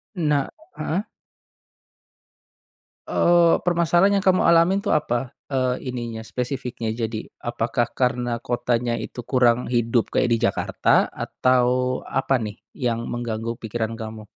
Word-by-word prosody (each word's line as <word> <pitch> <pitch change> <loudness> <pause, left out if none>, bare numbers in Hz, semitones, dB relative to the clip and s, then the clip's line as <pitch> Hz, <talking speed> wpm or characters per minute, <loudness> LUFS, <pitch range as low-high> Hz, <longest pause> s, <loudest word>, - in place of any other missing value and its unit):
Nah 150 -5 +1 0.3
heeh. 180 +6 -1 2.1
Eee, 170 -1 +4
permasalahan 175 +3 +3
yang - - -10
kamu 185 -1 +4
alamin 170 +3 +5
tuh, 200 - 0
apa, 120 -4 -1 0.2
eee, 130 -1 -1
ininya, 115 -2 -5
spesifiknya? 120 -2 -4
Jadi, 110 -1 -4 0.2
apakah 120 0 -1
karena 125 -2 0
kotanya 120 0 -1
itu 120 0 -6
kurang 125 -2 +3
hidup 120 -1 +1
kayak 125 - +2
di 115 - +3
Jakarta? 115 - +2
Atau, 125 -1 +1 0.4
apa 135 0 +1
nih, 110 -2 -6 0.2
yang 115 -3 -1
mengganggu 115 -1 -3
pikiran 115 0 -4
kamu? 110 -1 -7
120 Hz, 120 wpm, -23 LUFS, 115-140 Hz, 2.1 s, alamin